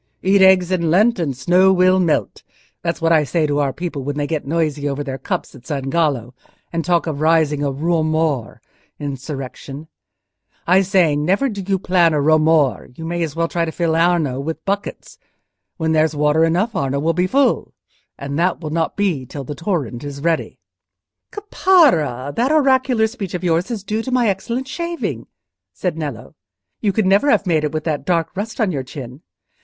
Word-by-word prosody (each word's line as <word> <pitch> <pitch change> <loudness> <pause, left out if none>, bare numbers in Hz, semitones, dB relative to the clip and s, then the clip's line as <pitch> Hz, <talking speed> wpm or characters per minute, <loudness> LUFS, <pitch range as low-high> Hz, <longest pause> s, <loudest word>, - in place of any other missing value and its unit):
"Eat 195 +1 +4
eggs 190 -1 +5
in 170 -3 0
Lent 210 +6 +3
and 155 -5 -1
the - - -16
snow 180 +8 +4
will 185 0 +4
melt. 170 -4 0 0.4
That's 170 0 -3
what 165 - +3
I 155 -2 +4
say 155 +2 0
to 145 -1 0
our 140 -2 +1
people 155 -1 -5
when 145 +2 -4
they 145 - -1
get 150 -2 -3
noisy 150 -2 -1
over 140 +1 -3
their 135 -2 -5
cups - - -4
at 130 -2 -15
San 135 -3 -3
Gallo, 140 -8 0 0.4
and 165 0 -1
talk 175 -1 +1
of 155 -3 -4
raising 155 -2 +2
a 145 -1 0
romor 155 -3 0 0.4
(insurrection): 140 +1 -7 0.8
I 185 +3 +4
say, 185 -5 +2
never 190 - +1
do 205 -3 -5
you 195 -1 +2
plan 175 -3 +2
a - - +1
romor; 155 -1 +2
you 165 - -7
may 175 +1 -3
as 160 -3 -3
well 165 0 0
try 170 0 -1
to 165 - -2
fill 165 -1 0
Arno 165 -6 +1
with 160 +4 -5
buckets. 200 +1 -4 0.6
When 160 -1 -1
there's 155 -1 +2
water 150 +2 +3
enough 185 +8 0
Arno 140 0 -1
will 165 +3 +1
be 180 +2 +1
full, 275 +7 +1 0.4
and 140 +2 -4
that 180 +1 +1
will 155 -3 -6
not 160 0 -1
be 175 -11 -1
till 140 +2 -7
the 140 - -6
torrent 145 - -3
is 140 -1 -6
ready." 165 -1 -1 0.7
"Caparra, 280 - +2
that 250 +5 +1
oracular 260 -6 +3
speech 215 -5 -5
of 180 - -5
yours 175 +3 +1
is 225 -5 -4
due 215 +2 -2
to 260 - -5
my 245 -3 +2
excellent 235 +7 -3
shaving," 340 +3 -4 0.5
said 180 -4 -2
Nello. 145 -8 -6 0.5
"You 205 - +1
could 215 +1 0
never 200 +9 +3
have 205 -6 +3
made 160 -4 +1
it 150 - -1
with 155 -1 -3
that 155 -3 -2
dark 165 -1 -1
rust 215 +5 -5
on 215 -5 +1
your 140 -5 -2
chin. 130 0 -9
165 Hz, 195 wpm, -19 LUFS, 145-190 Hz, 0.8 s, eggs